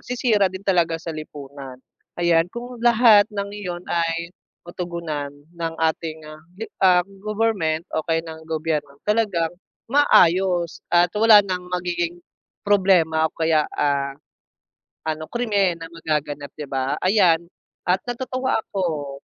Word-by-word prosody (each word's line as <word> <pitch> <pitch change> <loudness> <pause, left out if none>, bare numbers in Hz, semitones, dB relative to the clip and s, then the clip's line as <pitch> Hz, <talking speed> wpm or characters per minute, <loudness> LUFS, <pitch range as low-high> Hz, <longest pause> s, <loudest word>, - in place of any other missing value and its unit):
sisira 230 -6 +1
din 190 +1 -9
talaga 170 -4 +2
sa 165 0 -6
lipunan, 140 -3 -9 0.4
ayan 170 -1 +3
kung 240 +2 -8
lahat 230 -3 +6
ng 200 -1 -4
iyon 180 -4 -6
ay 170 0 -1 0.3
matugunan 170 -4 -4 0.3
ng 165 -1 -4
ating, 160 0 -1
ah, 155 0 -11 0.2
di 225 - -5 0.2
ah, 180 -1 +5 0.2
government 205 -7 0
o 160 - 0
kaya 165 0 +1
ng 160 0 -9
gobyerno 155 -3 -2
talagang 210 -7 +1 0.3
maayos 185 - +3
at 175 +1 +4
wala 215 0 +7
ng 180 -1 -2
magiging 175 -1 -2 0.5
problema 180 -6 +3
o - - -29
kaya, 160 -2 +2
ah, 140 -1 -1 0.9
ano 155 0 -3
krimen 205 -7 +1
na 165 - -6
magaganap 150 -3 -3
di 150 - -4
ba 135 +1 -1
ayan 180 -4 +4 0.4
at 180 +2 +2
natutuwa 255 +1 -1
ako. 155 -10 -3
170 Hz, 130 wpm, -22 LUFS, 160-200 Hz, 0.9 s, wala